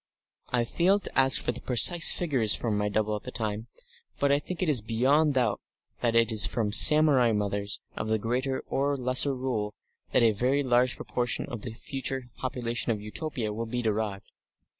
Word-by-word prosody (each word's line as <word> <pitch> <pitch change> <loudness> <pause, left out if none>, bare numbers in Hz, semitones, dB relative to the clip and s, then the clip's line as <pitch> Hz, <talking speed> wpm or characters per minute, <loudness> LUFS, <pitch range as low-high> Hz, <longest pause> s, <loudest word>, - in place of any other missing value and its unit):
I 120 -1 0
failed 190 - +1
to - - -7
ask 135 0 +4
for - - -2
the 125 - -10
precise 165 +7 +6
figures 130 -11 +2
from 115 -3 -3
my 105 0 -1
double 105 +1 -1
at 105 - -6
the - - -9
time, 110 0 -4 0.5
but 140 0 0
I 140 - +2
think 180 +4 -8
it - - -2
is 140 -7 +4
beyond 135 +7 +1
doubt 120 -5 0 0.4
that 115 -1 -1
it 115 0 +3
is 105 -2 +6
from 105 -1 -2
samurai 140 -2 +5
mothers 100 -1 -2
of - - -5
the 110 0 0
Greater 125 +5 -3
or 140 +1 -2
Lesser 130 +2 +1
Rule 120 -5 -4 0.4
that - - +2
a 115 - +4
very 130 +7 -1
large 125 0 +1
proportion 120 -1 -3
of 120 -3 -8
the 115 - -8
future 130 -1 -5
population 120 -2 -3
of 110 - -3
Utopia 110 +1 -5
will 115 +2 -5
be 120 +2 -4
derived. 105 -2 -3
120 Hz, 190 wpm, -26 LUFS, 110-135 Hz, 0.5 s, precise